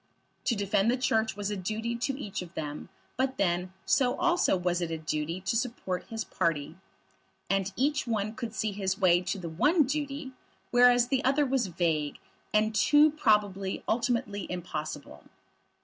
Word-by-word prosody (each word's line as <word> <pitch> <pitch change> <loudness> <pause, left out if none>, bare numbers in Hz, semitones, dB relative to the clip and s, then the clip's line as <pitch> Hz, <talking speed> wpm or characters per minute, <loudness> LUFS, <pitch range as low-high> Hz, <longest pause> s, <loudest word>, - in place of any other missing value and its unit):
To 235 - +2
defend 200 +1 +1
the 250 - +2
Church 220 -4 +1
was 205 0 -2
a - - -1
duty 220 +5 -3
to 265 +3 -2
each 205 -9 -4
of 175 -2 -10
them; 150 -1 -5 0.3
but 265 +1 0
then, 180 -1 0
so 250 -3 +3
also 350 - +2
was 180 0 0
it 170 - -1
a 165 - -2
duty 155 +2 -3
to 190 - -1
support 230 -6 -2
his 225 -1 -4
party. 165 -8 -1 0.8
And 195 0 +1
each 290 +1 0
one 215 -2 -1
could 230 -2 -6
see 215 -1 -1
his 190 -1 -2
way 175 -2 +4
to 190 - -3
the 180 -3 -6
one 295 - +3
duty, 285 0 -3 0.4
whereas 245 0 +5
the 270 -1 +1
other 275 +3 +3
was 260 -5 +1
vague, 160 -4 -1 0.3
and 215 +1 +2
too 295 +7 +5
probably 205 -8 +1
ultimately 235 -3 -1
impossible. 155 -5 -6
210 Hz, 165 wpm, -29 LUFS, 180-250 Hz, 0.8 s, whereas